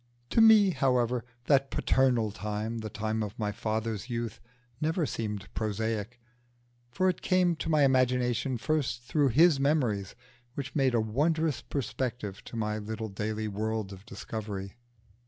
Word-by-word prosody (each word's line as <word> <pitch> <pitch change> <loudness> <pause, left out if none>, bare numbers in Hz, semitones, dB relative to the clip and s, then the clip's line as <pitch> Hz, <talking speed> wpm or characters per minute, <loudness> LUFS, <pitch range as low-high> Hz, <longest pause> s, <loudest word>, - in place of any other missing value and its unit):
To 225 - +4
me, 215 -3 +7
however, 125 -5 +1 0.2
that 135 -1 +3
paternal 125 -5 +2
time, 105 +3 -3
the 110 -1 -5
time 110 +1 -2
of 105 -1 -4
my 105 -2 -1
father's 110 +2 -3
youth, 115 -2 -3 0.4
never 160 +2 +1
seemed 105 -6 -4
prosaic, 110 +1 -2 0.7
for 185 +9 +1
it 185 - 0
came 180 -2 +3
to 160 - -3
my 155 -2 +4
imagination 125 -1 +2
first 130 -2 -1
through 145 +3 +2
his 155 +4 +5
memories, 125 -9 +1 0.4
which 135 -1 -5
made 135 -4 +3
a - - +4
wondrous 145 +5 +1
perspective 120 -6 -4
to - - -9
my 105 -1 -1
little 110 +1 -5
daily 110 +2 -3
world 105 0 -2
of 95 0 -12
discovery. 100 -4 -6
115 Hz, 145 wpm, -29 LUFS, 110-140 Hz, 0.7 s, me